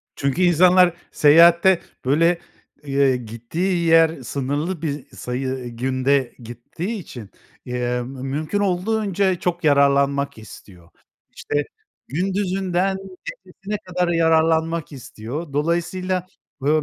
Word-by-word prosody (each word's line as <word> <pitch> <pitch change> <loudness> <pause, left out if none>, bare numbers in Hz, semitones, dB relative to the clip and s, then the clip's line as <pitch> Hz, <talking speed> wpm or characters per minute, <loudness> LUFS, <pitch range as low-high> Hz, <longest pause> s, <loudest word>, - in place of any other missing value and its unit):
Çünkü 140 +6 -1
insanlar 180 +1 +5 0.2
seyahatte 170 +4 +6 0.2
böyle, 165 +5 +3 0.4
eee, 135 -2 +2
gittiği 160 - -3
yer 165 -3 +4
sınırlı 145 +7 -3
bir 145 -4 -3
sayı, 125 +2 -4
ııı, 130 -1 -4
günde 130 +2 0
gittiği 120 - -7
için, 120 - -10 0.4
emm, 125 0 -2 0.2
mümkün 155 +8 -2
olduğunca 195 -1 0
çok 175 -1 -2
yararlanmak 140 -2 +2
istiyor. 95 -5 -14 0.5
İşte 145 0 -2 0.4
gündüzünden 190 +2 -1 0.5
gecesine 205 +1 -6
kadar 180 0 -1
yararlanmak 165 0 +2
istiyor. 135 +3 -7
Dolayısıyla, 175 +4 -1 0.4
eee, - - +3
160 Hz, 100 wpm, -21 LUFS, 135-180 Hz, 0.5 s, seyahatte